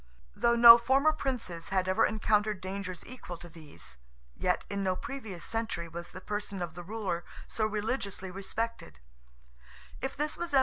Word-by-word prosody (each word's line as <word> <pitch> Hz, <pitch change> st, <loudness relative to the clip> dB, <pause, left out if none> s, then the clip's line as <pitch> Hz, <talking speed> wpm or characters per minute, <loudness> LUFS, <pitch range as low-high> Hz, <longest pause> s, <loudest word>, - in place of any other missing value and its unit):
Though 235 Hz, 0 st, +3 dB
no 235 Hz, 0 st, +11 dB
former 270 Hz, +6 st, +4 dB
princes 240 Hz, -, -4 dB
had 185 Hz, -1 st, +1 dB
ever 185 Hz, -, +4 dB
encountered 210 Hz, -1 st, +1 dB
dangers 185 Hz, -1 st, -5 dB
equal 230 Hz, -8 st, -8 dB
to 175 Hz, +1 st, -11 dB
these—yet -, -, -5 dB
in 200 Hz, -1 st, -3 dB
no 185 Hz, -1 st, +1 dB
previous 225 Hz, -9 st, -6 dB
century 225 Hz, -7 st, -2 dB
was 170 Hz, +1 st, -7 dB
the 185 Hz, -, -9 dB
person 205 Hz, -2 st, -3 dB
of 170 Hz, -1 st, -5 dB
the 175 Hz, -, -7 dB
ruler 190 Hz, -3 st, -3 dB, 0.2 s
so 215 Hz, -1 st, 0 dB
religiously 205 Hz, -3 st, -3 dB
respected. 195 Hz, -, -4 dB
195 Hz, 135 wpm, -30 LUFS, 175-225 Hz, 0.2 s, no